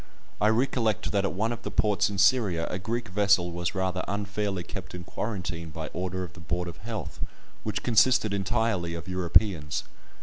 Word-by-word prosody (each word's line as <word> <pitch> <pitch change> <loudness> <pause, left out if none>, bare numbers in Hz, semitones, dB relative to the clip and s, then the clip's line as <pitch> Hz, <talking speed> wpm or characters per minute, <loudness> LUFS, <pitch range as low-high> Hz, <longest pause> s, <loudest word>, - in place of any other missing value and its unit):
I 105 - +5
recollect 115 -1 +1
that 100 -1 +2
at - - -1
one 110 +5 0
of 120 - -4
the - - -4
ports 105 -2 +2
in 100 - -4
Syria 100 -5 +4
a 90 - -2
Greek 115 +3 -3
vessel 95 -3 +3
was 85 +1 -2
rather 95 -1 0
unfairly 100 -1 -2
kept - - -7
in 90 - -6
quarantine 90 -5 -4
by 80 0 -5
order 95 +1 -3
of 85 -5 -8
the - - -13
Board 90 +2 -2
of 85 - -7
Health, 110 -4 -6 0.4
which - - -3
consisted 115 -1 +4
entirely 95 -3 0
of 85 +1 -7
Europeans. 90 -3 +2
95 Hz, 180 wpm, -28 LUFS, 90-105 Hz, 0.4 s, I